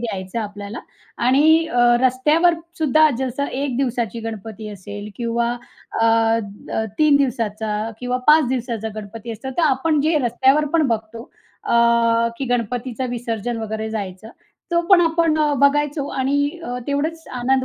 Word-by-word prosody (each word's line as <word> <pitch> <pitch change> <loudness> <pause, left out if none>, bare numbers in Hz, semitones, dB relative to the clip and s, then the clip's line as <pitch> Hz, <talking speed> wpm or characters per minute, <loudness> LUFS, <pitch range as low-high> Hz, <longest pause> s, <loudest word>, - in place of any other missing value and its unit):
द्यायचं 195 -3 -4
आपल्याला. 205 +1 -6 0.5
आणि 315 +5 +4
अ, 245 -6 0 0.2
रस्त्यावर 305 +7 +3 0.2
सुद्धा 310 0 +4
जसं 265 +2 -2
1 275 -2 -3
दिवसाची 240 -4 -2
गणपती 220 -1 -7
असेल 205 +2 -8
किंवा 235 0 -1 0.5
अ, 225 - +3
अ, 225 -1 0
3 305 -2 +5
दिवसाचा 220 -4 -1
किंवा 250 0 -1
5 305 -1 +6
दिवसाचा 235 -4 -3
गणपती 215 +2 -8
असतं. 230 +5 -7
तर 340 - +3
आपण 300 +1 +2
जे 310 +3 +1
रस्त्यावर 265 +5 +3
पण 320 -4 +3
बघतो 225 0 -3 0.4
अ, - - -2 0.7
की 275 - -2
गणपतीचं 245 +1 -2
विसर्जन 235 -1 -3
वगैरे 220 0 -4
जायचं. 205 -1 -6 0.4
तो 340 0 +3
पण 380 -3 +7
आपण 330 -1 +2 0.3
बघायचो 285 0 +2
आणि 270 +1 -1 0.3
अ, 245 +1 -4
तेवढंच 315 +3 -2 0.2
आनंद 260 +1 +2
245 Hz, 140 wpm, -21 LUFS, 220-285 Hz, 0.7 s, पण